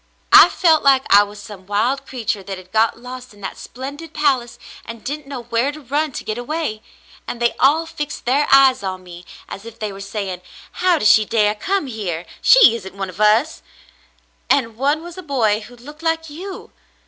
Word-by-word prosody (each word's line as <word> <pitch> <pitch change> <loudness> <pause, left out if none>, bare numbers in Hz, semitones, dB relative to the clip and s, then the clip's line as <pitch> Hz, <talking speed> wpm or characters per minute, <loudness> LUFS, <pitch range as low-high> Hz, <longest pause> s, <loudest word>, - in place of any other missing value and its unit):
"I - - +10
felt 320 -4 +3
like 270 -1 +4
I 200 - +9
was 205 0 -5
some 200 -3 -12
wild 230 +7 -1
creature 225 -5 -3
that 195 0 -7
had 185 0 -14
got 220 +1 +2
lost 250 -1 -10
in 205 - -18
that 190 - -6
splendid 280 +6 -9
palace 265 -5 0 0.3
and 230 -1 -10
didn't 290 +1 -5
know 270 -4 -7
where 235 +4 0
to 305 - -11
run 295 +3 -2
to - - -6
get 220 +2 -4
away; 245 -4 -3 0.5
and 235 - -5
they 235 0 +1
all 300 +5 +3
fixed 300 -3 -6
their 275 +4 +2
eyes 270 -3 +6
on 185 -1 -5
me 175 0 -12 0.2
as 195 - -9
if 230 0 -11
they 210 -2 -4
were 195 - -10
saying: 195 -2 -5 0.2
* - - -22
How 360 -2 +4
does 215 - +5
she 220 - +5
dare 210 -1 +1
come 380 - -2
here? 195 -9 -5 0.2
She - - +7
isn't 190 -3 -11
one 195 -1 -4
of 190 - -9
us! 220 +8 +3 0.5
' - - -39
and 230 -5 +1
one 285 +6 0
was 345 +1 -9
a - - -6
boy 235 - 0
who 235 +3 -13
looked 295 +6 -13
like 325 -1 -2
you. 370 +5 -9
245 Hz, 210 wpm, -19 LUFS, 210-295 Hz, 0.5 s, I